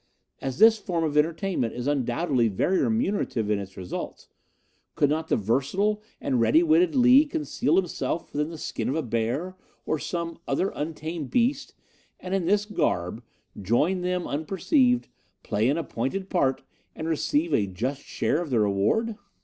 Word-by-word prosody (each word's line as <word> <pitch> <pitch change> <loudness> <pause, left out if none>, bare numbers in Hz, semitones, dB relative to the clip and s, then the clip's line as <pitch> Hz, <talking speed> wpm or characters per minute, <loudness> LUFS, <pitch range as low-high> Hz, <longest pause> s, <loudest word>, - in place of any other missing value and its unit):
As 135 -1 -3
this 225 0 +6
form 175 -5 -2
of 150 -2 -1
entertainment 160 - 0
is 125 - -4
undoubtedly 135 -1 +1
very 110 - +1
remunerative 200 - 0
in 105 - +1
its 95 0 -9
results, 90 -1 -6 0.7
could 145 -1 +2
not 160 +1 -1
the - - +2
versatile 140 - 0 0.2
and 130 -4 0
ready 320 - +5
witted 335 0 +3
Lee 255 +2 +7
conceal 300 -5 -1
himself 180 -2 -1
within 150 +1 -1
the 165 - -8
skin - - -3
of 135 - -1
a 160 - -1
bear, 120 +10 -2 0.3
or 155 - -1
some 170 0 -4
other 180 +8 0
untamed 155 -1 -4
beast, 255 +4 0 0.4
and 185 - -5
in 195 -3 0
this 205 +3 +2
garb, 115 - -1 0.4
joining 150 - +1
them 180 0 -1
unperceived, 240 - +1 0.4
play 110 +3 +1
an 145 - +1
appointed 165 +5 -3
part 135 -7 +1 0.3
and 160 - -5
receive 160 0 0
a 105 -7 +2
just 125 +10 -3
share 155 - -1
of 170 - -5
the 120 -4 +2
reward? 105 - +1
160 Hz, 160 wpm, -26 LUFS, 125-195 Hz, 0.7 s, Lee